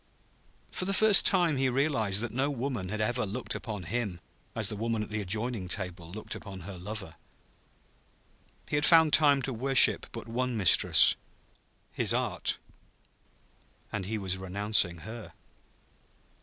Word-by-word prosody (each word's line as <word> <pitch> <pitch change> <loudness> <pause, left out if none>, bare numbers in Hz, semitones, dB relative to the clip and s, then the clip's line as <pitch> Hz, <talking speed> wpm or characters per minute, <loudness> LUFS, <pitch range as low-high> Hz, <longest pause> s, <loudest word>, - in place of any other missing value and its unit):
For 185 - -3
the 195 +1 -1
first 215 0 +6
time 175 -6 +2
he 130 0 +1
realized 120 -7 0
that 120 - -4
no 135 +3 -1
woman 125 -8 -4
had 105 +2 -4
ever 120 +3 -1
looked 110 +5 -4
upon 105 -5 -6
him 100 -1 -4 0.4
as - - -1
the - - -3
woman 115 0 -2
at 105 - -11
the 105 0 -2
adjoining 110 +1 -4
table 90 -3 -5
looked 110 +3 -6
upon 95 -2 -9
her 95 +3 -9
lover. 100 +2 -7 1.5
He 145 - -1
had 145 - -1
found 160 -3 +5
time 145 -3 +4
to 130 - -3
worship 130 +3 +4
but - - -9
one 125 +1 -3
mistress 95 -5 +6 0.8
his - - 0
art. - - -2 1.3
And 95 -3 -5
he 110 +1 -3
was 95 -2 -2
renouncing 95 -2 -1
her. 110 +5 -10
110 Hz, 150 wpm, -28 LUFS, 100-130 Hz, 1.5 s, first